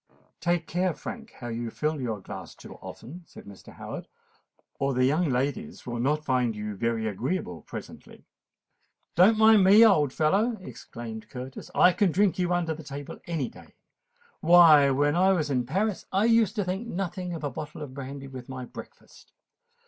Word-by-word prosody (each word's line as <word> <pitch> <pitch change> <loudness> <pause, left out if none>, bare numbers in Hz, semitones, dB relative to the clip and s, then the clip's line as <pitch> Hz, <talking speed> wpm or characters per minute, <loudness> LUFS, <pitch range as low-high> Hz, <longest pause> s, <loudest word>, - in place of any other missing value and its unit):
"Take 175 -1 0
care, 180 0 -1
Frank, 225 -2 -8
how 120 - -5
you 115 0 -4
fill 150 +3 -2
your 110 -5 -3
glass - - -9
too - - -12
often," 170 +9 -10
said - - -13
Mr. 100 -1 -13
Howard; - - -8 0.7
"or 135 -1 0
the 130 0 +3
young 155 +5 +2
ladies 145 - -2
will 120 -2 -4
not 150 +5 0
find 125 -4 +1
you 105 0 -5
very 115 +1 -1
agreeable 105 - -3
presently." - - -11 0.9
"Don't 195 +6 +5
mind 220 -2 +6
me, 205 +4 +8
old 150 - +4
fellow," 200 - +1
exclaimed 115 - -9
Curtis: 130 +1 -8
"I 180 - +6
can 200 -2 +2
drink 195 +1 +2
you 180 -1 0
under 175 -2 0
the 160 - -9
table 145 -1 -8
any 160 -7 -2
day. - - -15 0.6
Why, 160 -4 +7
when 145 +3 +2
I 190 +2 +4
was 155 -5 -1
in 125 -3 0
Paris 195 - -1
I 195 +3 +2
used 230 -3 +3
to 210 - 0
think 190 +5 -3
nothing 180 -2 -4
of 155 - -8
a 145 - -2
bottle 150 +3 -7
of 135 -3 -9
brandy 135 0 -7
with 130 -2 -10
my 130 -1 -6
breakfast. - - -13
150 Hz, 180 wpm, -27 LUFS, 130-185 Hz, 0.9 s, me